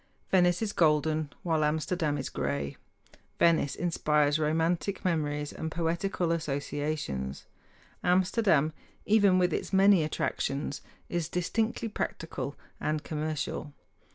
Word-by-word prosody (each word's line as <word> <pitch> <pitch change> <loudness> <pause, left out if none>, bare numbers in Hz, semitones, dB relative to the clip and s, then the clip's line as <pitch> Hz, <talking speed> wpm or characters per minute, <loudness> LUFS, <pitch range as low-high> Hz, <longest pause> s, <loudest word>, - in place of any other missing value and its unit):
Venice 180 +1 +4
is 205 -2 -2
golden; 155 -1 +2
while 160 -3 +1
Amsterdam 155 0 0
is 135 - -3
gray. 70 0 -2 0.6
Venice 165 -4 +3
inspires 150 -3 +2
romantic 165 +6 0
memories 150 -4 -1
and 160 - -4
poetical 170 +2 -1
associations; 145 - -3 0.6
Amsterdam, 180 -4 +3 0.3
even 205 -3 +5
with 180 -2 +2
its - - -3
many 195 -3 +6
attractions, 145 -2 -2 0.3
is 170 -2 -2
distinctly 220 +7 -1
practical 215 - -4 0.2
and 155 0 -1
commercial. 155 -1 -3
160 Hz, 105 wpm, -29 LUFS, 150-180 Hz, 0.6 s, many